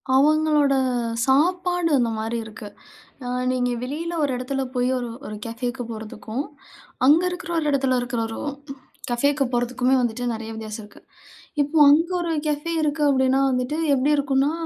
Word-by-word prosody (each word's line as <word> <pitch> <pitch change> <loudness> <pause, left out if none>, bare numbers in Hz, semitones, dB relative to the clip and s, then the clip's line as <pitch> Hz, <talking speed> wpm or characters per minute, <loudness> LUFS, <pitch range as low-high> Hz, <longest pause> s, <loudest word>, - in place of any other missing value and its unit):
அவங்களோட 300 0 +4 0.5
சாப்பாடு 355 +5 +2
அந்த 240 -2 +1
மாதிரி 225 +2 -2
இருக்கு. 215 -1 -9 0.6
அ - - -3 0.2
நீங்க 250 -1 0
வெளியில 315 +7 -4
ஒரு 280 - 0
இடத்துல 270 +2 -2
போய் 250 0 +1
ஒரு 245 -1 -4 0.2
ஒரு 210 - -6
கஃபேக்கு 245 +2 -4
போறதுக்கும், 220 +3 -5 0.6
அங்க 305 +5 +6
இருக்கிற 355 -1 -6
ஒரு 310 - -1
இடத்தில 265 -2 +2
இருக்கிற 245 -1 -3
ஒரு 225 - -6 0.7
கஃபேக்கு 280 +4 +2
போறதுக்குமே 250 +2 +1
வந்துட்டு, 245 0 -1
நிறைய 225 0 -6
வித்தியாசம் 220 0 -6
இருக்கு. 205 - -16 0.6
இப்போ 290 +3 -1
அங்க 320 +4 +4
ஒரு 340 -1 -2 0.2
கஃபே 300 +2 -1
இருக்கு 300 0 0
அப்படீனா 265 -1 +3
வந்துட்டு, 250 +4 -1 0.2
எப்படி 275 +2 +2
இருக்குனா 280 0 +2
265 Hz, 145 wpm, -23 LUFS, 245-295 Hz, 0.7 s, அங்க